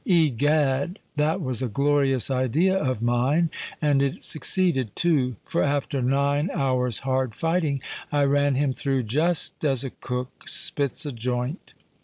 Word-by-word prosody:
Egad! 150 - +2 0.2
that 155 +5 +1
was 130 -5 -1
a 130 - 0
glorious 140 +1 +1
idea 135 +9 +2
of 130 - -1
mine; 130 +8 +2 0.3
and 145 -3 +2
it 140 -1 -1
succeeded 155 - +1
too;—for 130 -9 0
after 140 -1 0
nine 140 +5 +1
hours' 125 -4 +1
hard 130 -4 0
fighting, 165 -2 0 0.3
I 145 -1 +2
ran 140 0 +2
him 135 0 +1
through 135 -1 -1
just 155 +12 0
as 135 -4 +1
a 135 - -5
cook 125 +1 -6
spits 150 -1 0
a 145 - -3
joint. 125 - -4
140 Hz, 140 wpm, -24 LUFS, 130-150 Hz, 0.3 s, Egad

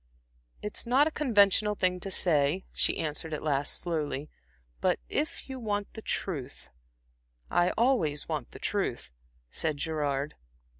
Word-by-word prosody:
"It's 210 +3 -1
not 260 +5 +5
a 315 - 0
conventional 210 -7 +4
thing 180 -2 +1
to 195 - -5
say," 165 -1 +2
she - - +2
answered 155 0 -2
at - - -6
last, 145 -2 +1
slowly 155 -4 -2 0.5
"but - - +2
if 310 - -2
you 265 -1 -6
want 205 -3 -2
the 220 - -7
truth" 145 -11 -3 0.8
"I 175 +1 +4
always 225 - +2
want 150 -6 -3
the - - -11
truth," - - -1 0.4
said 155 -2 -1
Gerard. 145 -2 -1
170 Hz, 140 wpm, -29 LUFS, 150-210 Hz, 0.8 s, not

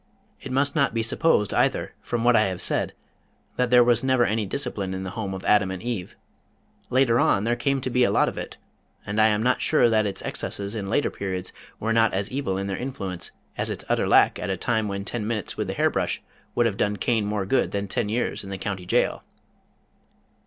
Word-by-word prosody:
It 135 - -7
must 140 +3 +1
not 140 -6 +2
be 115 - +1
supposed, 115 -3 +2
either - - +1
from 120 -1 -2
what 120 0 +5
I 110 - +5
have 95 -2 -3
said - - 0 0.6
that 125 -1 +1
there 125 0 +7
was 120 0 +3
never 130 -2 +3
any 110 0 0
discipline 100 -6 -3
in 95 - -4
the 95 - -5
Home 100 -2 -4
of 95 - -8
Adam 105 -2 +4
and 95 -1 -4
Eve. 115 -7 -4 0.7
Later 125 -2 +3
on 100 - +3
there 120 +2 +1
came 135 +3 0
to 130 - -2
be 125 +1 +3
a - - +4
lot - - +3
of - - -3
it, - - -7 0.5
and 105 +1 0
I 110 - +6
am 105 0 +1
not 125 +1 +2
sure 120 - +4
that 110 -1 +3
its 100 - -4
excesses 100 +1 -3
in 100 -3 -4
later 145 - +1
periods 95 -2 -4 0.3
were 115 +1 0
not 115 -3 +3
as 100 +3 -2
evil 130 -8 -2
in 100 - -2
their 95 -1 -3
influence 100 -9 -5 0.3
as - - 0
its - - -5
utter - - +1
lack - - +4
at - - -4
a 95 - -1
time 110 +2 0
when 100 0 -4
ten 105 -2 -3
minutes 110 -3 -3
with - - -3
the - - -2
hair - - +2
brush - - -1 0.4
would 120 - +3
have 105 -4 0
done 105 0 0
Cain 115 -1 +1
more 105 -1 -2
good 130 +7 +1
than 100 0 -3
ten 105 - -1
years 115 0 -1
in 100 - -9
the 95 - -4
county 95 -2 -5
jail. - - +1
110 Hz, 230 wpm, -25 LUFS, 100-120 Hz, 0.7 s, there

